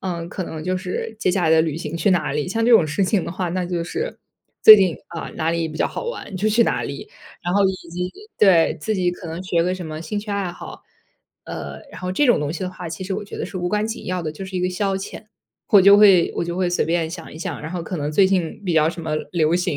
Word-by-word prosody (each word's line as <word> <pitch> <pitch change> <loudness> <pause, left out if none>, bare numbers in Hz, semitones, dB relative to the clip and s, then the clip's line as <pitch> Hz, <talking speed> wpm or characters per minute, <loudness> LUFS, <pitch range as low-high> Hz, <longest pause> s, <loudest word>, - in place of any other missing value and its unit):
嗯， 170 -3 -4
可 185 - -4
能 160 -2 -6
就 185 +2 -1
是 185 +4 -4
接 185 - +1
下 180 0 0
来 160 - +3
的 160 0 +5
旅 155 -2 -2
行 165 0 -5
去 170 +4 +2
哪 175 -6 +1
里。 150 +4 -2
像 225 +4 0
这 245 - +3
种 175 -9 +6
事 170 +6 0
情 185 -1 +1
的 170 - -5
话， 185 -1 -2
那 180 +1 -1
就 175 -1 -2
是， 460 - -4 0.4
最 215 - +12
近， 190 -5 +2
啊， 170 - -6
哪 160 +1 0
里 165 -1 -1
比 155 - -8
较 - - +2
好 - - -6
玩 475 - -6
就 210 +4 +1
去 230 +2 +4
哪 - - 0
里。 - - -6 0.3
然 175 +1 -1
后 200 0 +4
以 190 - +1 0.2
及 180 +1 -3 0.3
对， 185 -5 +5
自 220 +6 -1
己 180 -2 +1
可 180 0 -9
能 165 +3 -5
学 170 -2 +1
个 180 +1 0
什 180 -3 -7
么 155 0 -6
兴 205 +6 -3
趣 205 0 -6
爱 200 -3 -1
好。 - - -10 0.6
呃， - - -7
然 - - -10
后 180 0 -3
这 290 +11 +2
种 240 - +4
东 145 -1 -2
西 170 - -6
的 185 -1 -3
话， 180 -2 -8
其 165 +3 -6
实 190 - -4
我 205 - -3
觉 200 - -9
得 - - -3
是 185 - -6
无 175 0 -1
关 210 +2 0
紧 225 - -6
要 180 -1 -2
的， 155 -1 -4
就 190 +5 -8
是 190 -1 -6
一 - - -1
个 180 - +1
消 195 +1 -1
遣。 195 +2 -7 0.4
我 200 - +7
就 200 +1 +8
会， 195 -5 +6
我 - - 0
就 170 +1 -4
会 180 -1 0
随 175 - +1
便 165 -1 0
想 170 -2 -8
一 - - -9
想， 165 - -5
然 160 +2 -6
后 180 -2 -4
可 175 +2 -5
能 145 +1 -2
最 190 +5 +4
近 185 0 -1
比 180 - 0
较 155 -1 +4
什 165 +1 -5
么 155 -1 -2 0.2
流 165 -1 +2
行， 175 -3 0
180 Hz, 315 characters per minute, -21 LUFS, 165-195 Hz, 0.6 s, 最